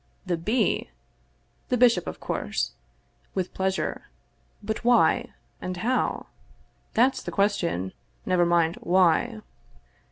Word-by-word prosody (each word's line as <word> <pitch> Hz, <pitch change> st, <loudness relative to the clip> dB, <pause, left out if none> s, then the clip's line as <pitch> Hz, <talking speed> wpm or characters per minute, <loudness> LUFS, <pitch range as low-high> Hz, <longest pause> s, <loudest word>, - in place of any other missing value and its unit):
The 180 Hz, -2 st, 0 dB
B.? 210 Hz, +10 st, 0 dB, 0.8 s
The 250 Hz, -, +2 dB
bishop, 240 Hz, -1 st, +4 dB
of -, -, -6 dB
course. -, -, -2 dB, 0.6 s
With 185 Hz, -2 st, -2 dB
pleasure. 190 Hz, 0 st, -2 dB, 0.6 s
But 220 Hz, +2 st, -3 dB
why? 240 Hz, 0 st, +3 dB, 0.3 s
And 185 Hz, 0 st, -4 dB
how? 245 Hz, +7 st, 0 dB, 0.7 s
That's 255 Hz, +4 st, +3 dB
the -, -, -6 dB
question, 175 Hz, -, 0 dB, 0.3 s
never 180 Hz, -1 st, +3 dB
mind 170 Hz, -1 st, +2 dB
"why." 185 Hz, +5 st, +2 dB
190 Hz, 105 wpm, -26 LUFS, 175-235 Hz, 0.8 s, bishop